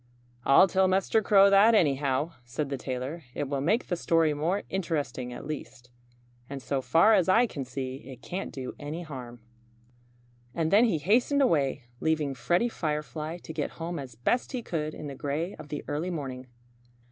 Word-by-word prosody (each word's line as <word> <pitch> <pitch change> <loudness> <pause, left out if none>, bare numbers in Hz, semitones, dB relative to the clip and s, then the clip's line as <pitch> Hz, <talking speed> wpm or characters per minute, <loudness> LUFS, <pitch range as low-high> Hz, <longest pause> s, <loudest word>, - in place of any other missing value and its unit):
"I'll 140 +7 +7
tell 190 0 +3
Mr. 195 +4 +2
Crow 200 -1 +6
that, 210 +3 +6
anyhow," 145 -3 +2
said 130 +4 -4
the 135 - -1
tailor. 130 +6 -5
"It 145 - -2
will 140 0 -2
make 215 - +1
the 180 - -1
story 165 -2 +2
more 165 +7 -1
interesting, 150 -9 -3
at 125 - -8
least. 135 -4 -7 0.6
And 140 0 -5
so 135 +1 -2
far 165 +11 +5
as 190 -4 +3
I 230 +6 +5
can 145 - -5
see, 130 0 -5
it 130 -1 -12
can't 185 +2 -4
do 130 -2 -6
any 150 +4 -5
harm." 125 -6 -9 1.1
And 160 -1 0
then 210 +4 +6
he 215 -9 +1
hastened 240 - +3
away, 140 - +1 0.2
leaving 155 -3 0
Freddie 175 - +1
Firefly 155 -3 -3
to 160 - -7
get 155 -2 -2
home 170 0 -4
as 130 -4 -8
best 240 - 0
he 250 -2 -3
could 155 -5 -3
in - - -8
the 140 - -5
gray 145 +7 -3
of 150 - -11
the 150 - -4
early 155 +5 -2
morning. 135 -6 -5
155 Hz, 180 wpm, -28 LUFS, 135-185 Hz, 1.1 s, I'll